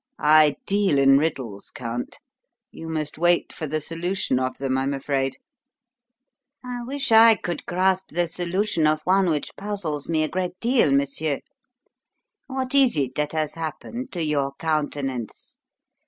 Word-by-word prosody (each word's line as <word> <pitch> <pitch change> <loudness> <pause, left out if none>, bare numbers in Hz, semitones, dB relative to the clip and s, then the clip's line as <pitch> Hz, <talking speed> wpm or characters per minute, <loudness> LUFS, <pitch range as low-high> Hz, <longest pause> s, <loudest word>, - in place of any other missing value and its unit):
"I 150 -1 +5
deal 195 -6 +2
in 135 0 +6
riddles, 130 -10 -3
Count; 120 0 -6 0.5
you 165 - -9
must 155 -1 -3
wait 175 +1 +2
for 155 - -5
the 155 +2 -1
solution 165 -3 -1
of 130 0 -2
them, 135 -1 -1
I'm 135 +1 0
afraid." 135 -1 -2 1.3
"I 250 -1 -5
wish 275 +1 -3
I 225 0 +8
could 175 -3 -5
grasp 190 +1 +1
the 175 +2 0
solution 175 0 0
of 155 0 +1
one 190 +1 +3
which 155 -3 -2
puzzles 190 -9 -4
me 160 -1 +2
a - - +1
great 180 +1 -3
deal, 235 - +3
monsieur. 140 +1 0 1.1
What 260 -1 -3
is 270 - +5
it 135 -3 -1
that 150 +2 -2
has 155 -2 -1
happened 165 - -6
to 175 -3 -2
your 140 -3 0
countenance? 145 -7 -3
155 Hz, 150 wpm, -24 LUFS, 140-185 Hz, 1.3 s, I